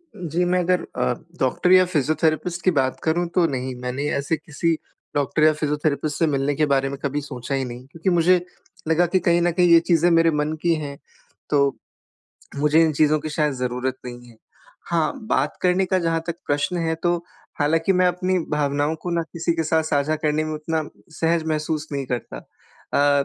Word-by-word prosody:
जी, 175 Hz, -2 st, -2 dB
मैं 180 Hz, +1 st, +2 dB
अगर 180 Hz, 0 st, +2 dB
अ, 65 Hz, -, +1 dB, 0.3 s
डॉक्टर 180 Hz, -, +1 dB
या 185 Hz, 0 st, +7 dB
फ़िज़ियोथेरेपिस्ट 155 Hz, +1 st, 0 dB
की 185 Hz, -, +5 dB
बात 130 Hz, -5 st, 0 dB
करूँ 170 Hz, +2 st, +1 dB
तो 180 Hz, -, +4 dB
नहीं 130 Hz, -2 st, -3 dB
मैंने 125 Hz, +3 st, -3 dB
ऐसे 140 Hz, +3 st, 0 dB
किसी 160 Hz, +2 st, -1 dB, 0.4 s
डॉक्टर 145 Hz, +1 st, +1 dB
या 155 Hz, -, +7 dB
फ़िज़ियोथेरेपिस्ट 150 Hz, -1 st, -1 dB
से 165 Hz, -, +3 dB
मिलने 140 Hz, -1 st, 0 dB
के 155 Hz, +2 st, +2 dB
बारे 135 Hz, 0 st, +2 dB
में 140 Hz, -, -5 dB
कभी 145 Hz, +1 st, -1 dB
सोचा 135 Hz, -1 st, -5 dB
ही 135 Hz, -1 st, -1 dB
नहीं 125 Hz, +1 st, -8 dB
क्योंकि 165 Hz, +3 st, -2 dB
मुझे 175 Hz, 0 st, +3 dB, 0.4 s
लगा 160 Hz, +2 st, +3 dB
कि 185 Hz, +2 st, +1 dB
कहीं 175 Hz, -1 st, +2 dB
न 175 Hz, 0 st, +2 dB
कहीं 175 Hz, +1 st, +3 dB
ये 165 Hz, -, +9 dB
चीजें 170 Hz, 0 st, +2 dB
मेरे 165 Hz, 0 st, +4 dB
मन 150 Hz, +1 st, -1 dB
की 170 Hz, -1 st, +2 dB
हैं। 140 Hz, -2 st, -6 dB, 0.5 s
तो 145 Hz, -, +3 dB, 1.0 s
मुझे 150 Hz, +2 st, +4 dB
इन 160 Hz, -1 st, +2 dB
चीज़ों 155 Hz, +1 st, +3 dB
की 155 Hz, -, -5 dB
शायद 150 Hz, -1 st, 0 dB
ज़रूरत 125 Hz, +1 st, -2 dB
नहीं 120 Hz, 0 st, -9 dB
है। 115 Hz, -, -17 dB, 0.5 s
हाँ, 165 Hz, -2 st, +1 dB, 0.2 s
बात 140 Hz, +3 st, 0 dB
करने 180 Hz, +1 st, +3 dB
का 185 Hz, +1 st, +1 dB
जहाँ 165 Hz, -2 st, 0 dB
तक 170 Hz, -1 st, -3 dB
प्रश्न 145 Hz, +5 st, 0 dB
है 160 Hz, -, +1 dB
तो 175 Hz, 0 st, +2 dB, 0.4 s
हालाँकि 165 Hz, +5 st, +2 dB
मैं 185 Hz, 0 st, +3 dB
अपनी 180 Hz, +1 st, +1 dB
भावनाओं 145 Hz, +1 st, 0 dB
को 175 Hz, -, -3 dB
ना 170 Hz, -1 st, 0 dB
किसी 170 Hz, 0 st, 0 dB
के 165 Hz, 0 st, -1 dB
साथ 160 Hz, +1 st, +2 dB
साझा 150 Hz, 0 st, 0 dB
करने 155 Hz, 0 st, 0 dB
में 155 Hz, -, -4 dB
उतना 155 Hz, +1 st, -2 dB, 0.4 s
सहज 165 Hz, 0 st, +2 dB
महसूस 155 Hz, 0 st, -2 dB
नहीं 140 Hz, -2 st, -3 dB
करता। 120 Hz, -, -4 dB
अ, 145 Hz, -, -1 dB
155 Hz, 195 wpm, -22 LUFS, 145-170 Hz, 1.0 s, ये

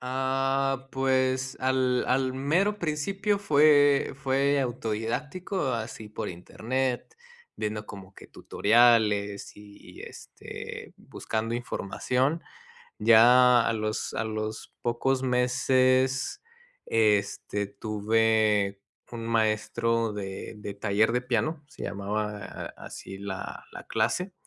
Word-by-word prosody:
Ah, 135 Hz, +1 st, -1 dB
pues, 130 Hz, 0 st, 0 dB
al 130 Hz, -1 st, +1 dB
al 130 Hz, 0 st, +1 dB
mero 175 Hz, +11 st, +1 dB
principio 195 Hz, +6 st, -1 dB
fue 145 Hz, -6 st, +4 dB
fue 135 Hz, +1 st, +1 dB
autodidáctico, 130 Hz, -, -2 dB
así 110 Hz, -2 st, -5 dB
por 105 Hz, -, -5 dB
internet, 125 Hz, -, -3 dB, 0.4 s
viendo 105 Hz, 0 st, -3 dB
como 95 Hz, -1 st, -11 dB
que -, -, -14 dB
tutoriales 105 Hz, -3 st, +2 dB
y, 105 Hz, -1 st, -14 dB
este, -, -, -9 dB
buscando 115 Hz, +1 st, -4 dB
información, 125 Hz, -, -1 dB, 0.6 s
ya 120 Hz, +2 st, +6 dB
a -, -, +2 dB
los 110 Hz, 0 st, -3 dB
a -, -, -1 dB
los 110 Hz, 0 st, -5 dB
pocos 130 Hz, +2 st, 0 dB
meses, 130 Hz, +1 st, +2 dB, 0.5 s
este, 105 Hz, -2 st, +1 dB
tuve 105 Hz, -1 st, +1 dB, 0.3 s
un 115 Hz, -1 st, -6 dB
maestro 115 Hz, +1 st, +1 dB
de 95 Hz, +1 st, -6 dB
de 105 Hz, -1 st, -6 dB
taller 105 Hz, +2 st, +1 dB
de 125 Hz, +1 st, 0 dB
piano, 130 Hz, +6 st, -1 dB
se -, -, -10 dB
llamaba 105 Hz, +1 st, -4 dB
así 95 Hz, -, -9 dB
la 100 Hz, -2 st, -6 dB
la -, -, -9 dB
clase, 175 Hz, -, -1 dB
120 Hz, 105 wpm, -27 LUFS, 110-135 Hz, 0.6 s, ya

